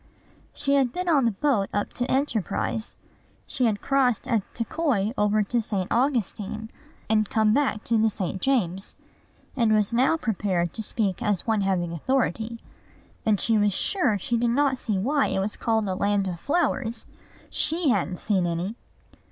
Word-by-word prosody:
She 280 -1 -1
had 270 -3 +3
been 360 +6 -4
on 290 -7 +4
the 230 - +3
boat 210 -2 0
up 205 - -2
to 245 0 -2
Enterprise; 225 -4 -1 0.5
she 255 - -1
had 210 -3 0
crossed 260 -5 +1
at 225 -3 +2
Tekoi 230 -4 0
over 210 -1 +2
to 235 +4 0
St. 200 -4 -2
Augustine, 220 -4 -1 0.4
and 215 -1 +2
come 220 -4 +3
back 260 -6 +1
to 230 -2 +1
the 220 0 +4
St. 190 -2 -4
James; 195 -8 0 0.6
and 230 -4 +2
was 210 +1 +1
now 265 +7 +3
prepared 190 - -1
to - - -2
speak 205 -3 -1
as 205 -4 0
one 220 -2 +1
having 185 -3 0
authority: 230 - -1 0.7
and 210 -3 +3
she 225 -2 +2
was 205 -1 +2
sure 285 - +2
she 235 +5 -1
did 235 +1 +1
not 265 +1 +2
see 210 -4 -1
why 275 +9 +1
it - - -2
was 200 +2 -2
called 220 -2 0
a 190 - -1
land 200 +1 +1
of 175 -2 -4
flowers. 265 - -1 0.5
She 320 -1 +2
hadn't 190 -5 0
seen 190 -3 0
any. 170 +5 -2
220 Hz, 170 wpm, -25 LUFS, 200-260 Hz, 0.7 s, on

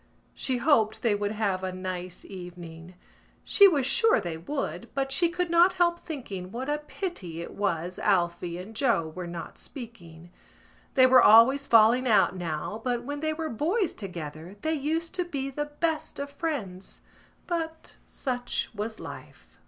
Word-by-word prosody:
She 260 -2 -2
hoped 240 -5 +2
they 230 -3 +3
would 205 0 -1
have 200 -4 -1
a 185 - -2
nice 185 -1 -6
evening. 175 -2 -10 0.5
She 400 - +7
was 290 -8 +2
sure 445 - +4
they 175 -5 -4
would 275 - -4
but 270 -1 -1
she 335 +5 +3
could 355 0 -2
not 345 +2 +6
help 345 -1 +2
thinking 200 - -7
what 260 +6 -3
a 295 - 0
pity 295 - -6
it 170 - -7
was 180 -3 -2
Alphy 175 -3 0
and 210 +5 -9
Joe 205 - +1
were 180 -1 -5
not 170 -1 -7
speaking. 175 - -10 0.6
They 260 -2 +7
were 255 -1 +7
always 260 +7 +7
falling 235 +3 +5
out 195 -5 +4
now 175 +5 -4
but 245 -2 -1
when 290 +3 -4
they 310 +1 -1
were 320 0 -3
boys 330 - 0
together 170 -2 -7
they 315 - +1
used 320 +3 -2
to 360 - 0
be 275 -5 -4
the 295 +2 -2
best 310 +1 -2
of 280 0 -5
friends: 245 - -4 0.4
but 325 -2 -4
such 245 -2 -3
was 220 +1 -4
life. - - -11
235 Hz, 165 wpm, -27 LUFS, 185-295 Hz, 0.6 s, She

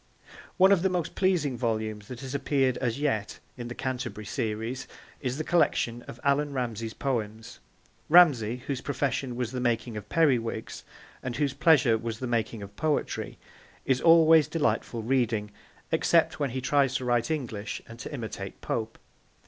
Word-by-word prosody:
One 190 +1 +6
of 195 -4 +5
the 190 - +2
most 175 -2 -2
pleasing 175 -9 +1
volumes 110 -3 -2
that 125 0 -8
has 135 0 -6
appeared 135 -2 +1
as 125 0 -2
yet 110 -9 -1 0.2
in 120 -2 -6
the 120 - -6
Canterbury 130 -5 -4
Series 110 +5 -3 0.3
is 130 -1 -3
the 155 - -2
collection 120 -8 +1
of 120 - -9
Allan 140 +1 +1
Ramsay's 115 -3 -3
poems. 115 -5 -3 0.5
Ramsay, 130 -9 +5
whose 140 -3 -3
profession 135 -2 -2
was 120 -1 -2
the 130 - -3
making 120 -1 -1
of 105 0 -8
periwigs, 120 -9 0 0.4
and 125 -2 -4
whose 145 -2 0
pleasure 140 -6 +4
was 115 -1 -4
the 130 - -4
making 115 -3 -1
of 100 +1 -11
poetry, 155 +3 -2 0.5
is 130 -1 +1
always 165 -2 +6
delightful 115 -6 -1
reading, 115 -4 0 0.4
except - - +2
when 140 -2 0
he 130 +2 -4
tries 135 0 +2
to 130 - -1
write 120 +1 +1
English 120 -9 -3
and 115 +1 -11
to - - -7
imitate 110 -7 -6
Pope. 110 -1 -3
125 Hz, 165 wpm, -28 LUFS, 115-145 Hz, 0.5 s, One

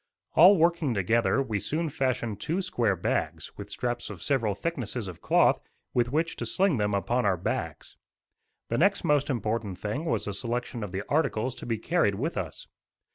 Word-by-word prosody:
All 190 +4 +8
working 170 -6 +2
together, 110 +5 +2
we 110 -6 -2
soon 160 - -1
fashioned 125 -6 -1
two 180 +5 -1
square 115 - +1
bags, 85 - -2
with - - -8
straps 120 -1 -3
of 100 -5 -8
several 115 -8 +1
thicknesses 125 -7 -3
of 90 -3 -9
cloth, - - +4 0.3
with 120 -1 +1
which 165 +3 0
to - - -3
sling 190 -7 +2
them 105 -1 +1
upon 120 +5 0
our 95 - +2
backs. 85 - -4 0.7
The 115 - 0
next 200 +3 +3
most 150 -3 +2
important 110 -5 -2
thing 105 - -3
was 165 - 0
the 105 - -3
selection 120 +2 -3
of 100 - -5
the 95 +2 -3
articles 130 -5 +1
to - - -9
be 115 -2 0
carried 110 - +1
with 145 - -2
us. 85 -6 -5
120 Hz, 185 wpm, -28 LUFS, 105-155 Hz, 0.7 s, All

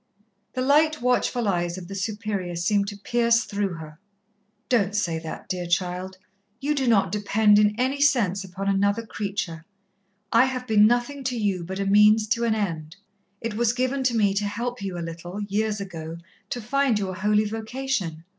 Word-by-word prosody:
The 255 - -1
light, 305 +3 +3
watchful 245 -1 +1
eyes 175 -2 0
of 180 -2 -8
the 195 - -7
Superior 200 -3 -3
seemed 200 +4 +1
to 205 0 -6
pierce 235 +2 +2
through 200 -4 -2
her. 155 -1 -10 0.7
"Don't 210 -5 +1
say 170 -5 0
that, 160 -1 -8
dear 180 -2 -3
child. 180 +1 -1 0.4
You 295 +2 0
do 270 -3 -1
not 200 -5 +3
depend 210 0 +3
in 210 +1 +2
any 265 +3 0
sense 205 -9 +2
upon 195 +1 -6
another 200 +3 +1
creature. 195 -6 -4 0.7
I 230 +3 +6
have 255 -1 -3
been 215 -2 +5
nothing 245 +4 0
to 250 -1 -1
you 200 -5 0
but 190 +3 -5
a 200 - -1
means 210 +2 +5
to 235 0 +1
an 225 -1 +2
end. 165 -6 -3 0.5
It 230 -1 -3
was 230 +1 +1
given 255 +2 -1
to 240 -2 +2
me 205 -3 +3
to 205 +1 -1
help 235 +4 -3
you 190 -3 -4
a 170 - -4
little, 170 +4 -7
years 210 +1 -1
ago, 165 -4 -6 0.3
to 245 - -3
find 265 0 +1
your 195 -2 -2
holy 210 +2 +2
vocation. 220 -6 -3
210 Hz, 185 wpm, -25 LUFS, 190-235 Hz, 0.7 s, I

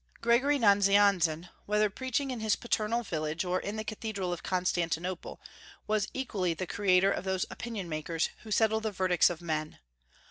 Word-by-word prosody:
Gregory 255 +5 +3
Nazianzen, 200 - +4 0.2
whether 210 +1 +3
preaching 260 +5 -2
in 250 - -4
his 220 -1 +1
paternal 235 0 -1
village 160 -2 -3
or 180 +1 0
in 205 - -5
the 215 - -3
cathedral 210 -4 -4
of 175 - -6
Constantinople, 180 -1 -2 0.5
was 215 -1 0
equally 195 -10 -2
the 185 - -3
creator 190 0 +3
of - - -2
those 190 -1 -1
opinion 225 -6 -5
makers 160 +1 -2
who 220 - -12
settle 220 +1 +2
the 220 -1 -3
verdicts 185 -2 +3
of 175 -1 -6
men. 155 -2 -3
195 Hz, 165 wpm, -30 LUFS, 175-220 Hz, 0.5 s, Nazianzen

